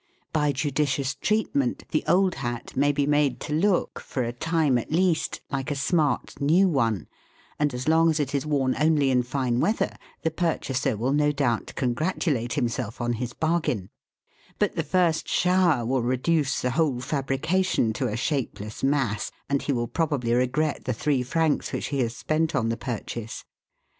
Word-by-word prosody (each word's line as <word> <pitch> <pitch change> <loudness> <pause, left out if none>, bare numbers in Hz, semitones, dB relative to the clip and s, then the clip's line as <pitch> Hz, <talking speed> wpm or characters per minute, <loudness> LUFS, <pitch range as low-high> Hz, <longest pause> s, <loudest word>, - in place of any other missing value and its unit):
By 150 -2 +2
judicious 140 -1 0
treatment, 185 - 0
the 155 - +1
old 185 0 +3
hat 120 -2 -4
may 145 +2 +3
be 145 0 0
made 145 -4 +2
to 150 - -4
look, 180 +4 +1
for 130 - -3
a 120 0 -3
time 155 -1 +1
at 120 - -7
least, 175 0 +1
like 135 0 -2
a 145 - -1
smart 150 +1 0
new 170 +7 +4
one, 115 - 0 0.5
and 150 -1 +2
as 125 +2 -5
long 165 +1 +5
as 155 -1 +1
it 145 -2 -1
is 140 - 0
worn 140 -4 +1
only 150 -3 +3
in 125 -1 +3
fine 125 -1 -1
weather, 215 - 0 0.3
the 160 - +1
purchaser 140 -8 -1
will 125 +5 0
no 150 0 +3
doubt 135 -6 -1
congratulate 130 -2 -1
himself 120 -4 -2
on 120 0 0
his 120 +1 -4
bargain; 155 - -1 0.7
but - - 0
the - - +1
first 175 -3 +1
shower 180 -8 +3
will 130 +2 +1
reduce 130 +4 +1
the 125 - +1
whole 140 -3 +1
fabrication 140 +1 0
to 125 +3 -1
a 110 0 -3
shapeless 120 -6 -3
mass, 135 -7 0 0.2
and 140 0 +1
he - - -1
will 120 -3 0
probably 140 -6 0
regret 130 +5 0
the 130 - 0
three 140 -2 +1
francs 155 +4 0
which - - -3
he 140 - -1
has 115 -2 0
spent 155 +4 0
on 115 -1 +1
the 115 - 0
purchase. 115 -2 -5
140 Hz, 175 wpm, -25 LUFS, 125-155 Hz, 0.7 s, long